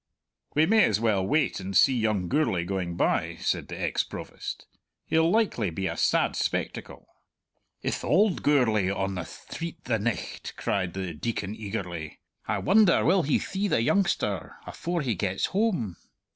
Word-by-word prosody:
"We 155 +2 +5
may 220 +3 +5
as 105 -1 +1
well 110 -4 +2
wait 140 +6 +1
and 95 0 -1
see 135 - +6
young 110 -6 0
Gourlay 115 - +1
going 90 -2 -3
by," - - +1
said - - -1
the - - -7
ex - - 0
Provost. - - -7 0.4
"He'll 160 +1 +3
likely 185 - +1
be 95 +4 -4
a - - -2
sad - - +2
spectacle." - - -3 0.8
"Ith - - -2
auld 195 +3 +3
Gourlay 110 -9 +3
on 95 0 -1
the 90 -2 -4
thtreet 170 0 -8
the 115 -3 0
nicht?" 115 +1 -3
cried 95 -3 -1
the 95 -3 -3
Deacon 100 +3 -3
eagerly. 90 -7 -5 0.3
"I - - 0
wonder 200 -2 +4
will 185 +2 +4
he 150 -2 +2
thee 195 +2 -2
the 115 - +2
youngster 120 - 0
afore 170 -2 -3
he 125 -4 0
gets 95 0 -1
hame! 185 - 0
110 Hz, 160 wpm, -27 LUFS, -, 0.8 s, see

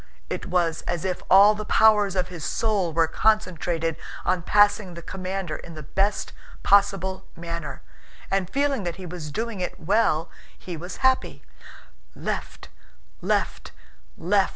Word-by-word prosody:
It - - -4
was 175 -3 +1
as 175 0 -2
if 185 -1 -2
all 200 +3 +8
the 215 0 -5
powers 210 -3 +4
of 180 -1 0
his 175 -3 -8
soul 205 -6 0
were 165 +1 +3
concentrated 170 -4 0 0.3
on 185 - +1
passing 205 -1 +3
the 170 - -9
commander 185 -3 -4
in 170 - -11
the 155 - -8
best 195 +8 -1 0.3
possible 195 -2 +2
manner, 170 -3 -6 0.5
and 195 -2 0
feeling 280 -1 +1
that 175 -3 -3
he 190 - -9
was 170 -3 -6
doing 225 +3 -3
it 180 - -4
well 170 -3 +1 0.3
he 180 - -7
was 175 +3 -7
happy. 260 0 +1 0.7
"Left... - - -5 0.5
left... - - -1 0.5
left..." 195 +3 +2
185 Hz, 145 wpm, -25 LUFS, 170-205 Hz, 0.7 s, all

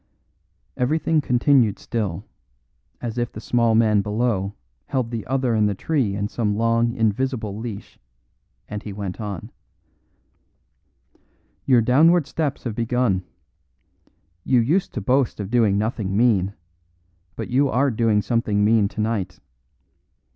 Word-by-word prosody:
Everything 155 +4 +1
continued 125 -4 +3
still, 100 -8 -3 0.8
as 120 0 -4
if 120 - -2
the - - -8
small 115 0 +1
man 110 -2 +4
below 105 -1 -1 0.3
held 130 -5 -2
the 115 -3 -3
other 130 -2 0
in 105 -1 +3
the 100 - -1
tree 125 -4 -1
in 100 0 -2
some 105 -2 -1
long 115 +1 +1
invisible 110 -1 -1
leash; 110 -2 -8 0.7
and 105 -1 -5
he 105 - -7
went 100 +1 -5
on: 100 -5 -6 2.2
"Your 125 -3 +5
downward 155 +8 +4
steps 145 0 -3
have 120 - -3
begun. 115 -4 0 1.2
You 130 - +3
used 155 +12 +1
to 120 - -2
boast 125 +4 +1
of 100 0 -5
doing 110 -5 +3
nothing 105 -2 -2
mean, 105 -5 +2 0.8
but - - -6
you 135 +2 +3
are 135 +2 +2
doing 110 -2 +1
something 105 -3 +1
mean 110 -1 +4
tonight. 105 -3 -3
115 Hz, 130 wpm, -22 LUFS, 105-125 Hz, 2.2 s, Your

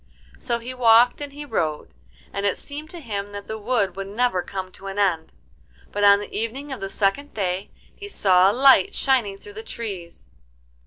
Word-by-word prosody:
So 240 -2 -1
he 240 +2 -7
walked 240 +1 +5
and 290 -1 -5
he 290 +1 -8
rode, 160 - -2 0.4
and 200 - -3
it 200 -2 +1
seemed 295 +2 -6
to 345 - -8
him 205 -7 -5
that 200 0 -7
the 220 0 -6
wood 215 -3 0
would 195 0 -5
never 210 -2 0
come 185 0 -6
to 195 - -11
an 195 +1 -6
end. 175 -6 +1 0.6
But 205 - -2
on 200 0 +7
the 205 - -8
evening 255 +6 -4
of 265 - -5
the 195 - -3
second 210 +10 -1
day 190 -1 -2 0.3
he 405 -1 -9
saw 190 - +4
a - - +3
light 270 - +5
shining 240 -8 +1
through 205 +1 -12
the 215 - -7
trees. 200 -7 -7
210 Hz, 200 wpm, -23 LUFS, 195-255 Hz, 0.6 s, on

